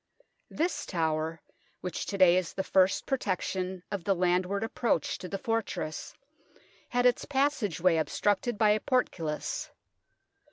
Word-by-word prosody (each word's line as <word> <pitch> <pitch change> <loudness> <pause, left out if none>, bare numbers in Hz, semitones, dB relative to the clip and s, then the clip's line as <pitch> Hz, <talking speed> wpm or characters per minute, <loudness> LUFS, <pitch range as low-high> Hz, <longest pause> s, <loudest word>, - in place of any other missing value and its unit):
This 340 +4 -1
tower, 160 -2 -1 0.4
which 180 -3 -4
to 200 - -3
day 180 -2 +7
is 185 -2 -1
the 190 - -2
first 190 0 +3
protection 185 -6 -2
of 200 -4 -3
the 195 +1 +2
landward 180 +3 +1
approach 225 - 0
to 180 - -6
the 195 - -2
fortress, 220 -7 -3 0.7
had 245 0 +1
its 245 -1 +3
passage 270 - 0
way 175 -1 +4
obstructed 205 +8 0
by 215 -1 +5
a 210 - +3
portcullis. 165 - -1
190 Hz, 135 wpm, -29 LUFS, 175-225 Hz, 0.7 s, day